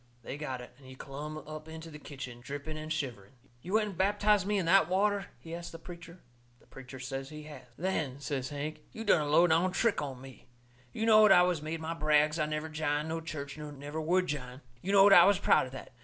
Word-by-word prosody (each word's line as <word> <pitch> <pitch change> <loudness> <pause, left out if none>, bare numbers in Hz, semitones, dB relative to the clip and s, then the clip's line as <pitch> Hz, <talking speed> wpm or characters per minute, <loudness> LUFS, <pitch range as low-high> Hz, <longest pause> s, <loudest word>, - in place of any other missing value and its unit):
They - - -6
got 135 -4 -5
it, 125 - -12
and 135 - -16
he 130 - -11
clumb 145 +4 -7
up 155 0 -9
into 160 0 -9
the 150 - -10
kitchen, 130 -5 -9
dripping 145 +4 -6
and 155 0 -6
shivering. 125 -9 -4 0.3
"You 180 +7 -7
went 215 -1 +2
and 195 - -9
baptized 205 0 +3
me 210 0 +1
in 190 - 0
that 180 -1 +5
water?" 200 +2 +1
he 165 - -10
asts 170 0 -6
the 165 - -8
preacher. 170 +1 -11 0.4
The - - -24
preacher 130 0 -11
says 135 +1 -5
he 150 0 -9
has. 145 -4 -11
"Then," 155 -6 -2
says 135 -2 -3
Hank, 150 +1 -5
"you 225 - -6
done 175 - +4
a 150 - -2
low 165 +4 +6
down 175 +2 +3
trick 225 -5 +1
on 135 -3 -5
me. 130 -1 -13 0.4
You 220 - -2
knowed 215 -2 +7
I 180 - +8
has 180 -4 0
made 160 +1 -4
my 160 +1 -3
brags 155 0 +2
I 150 - +1
never 155 +1 -3
jined 155 0 -2
no 165 0 -3
church 155 -3 -6
nor 150 -1 -7
never 145 +2 -6
would 180 +4 +2
jine. 130 -4 -5 0.2
You 195 - -2
knowed 200 0 +7
I 175 -2 +9
was 200 0 +4
proud 175 - +3
of - - -12
that. 135 - -9
155 Hz, 240 wpm, -31 LUFS, 140-180 Hz, 0.4 s, I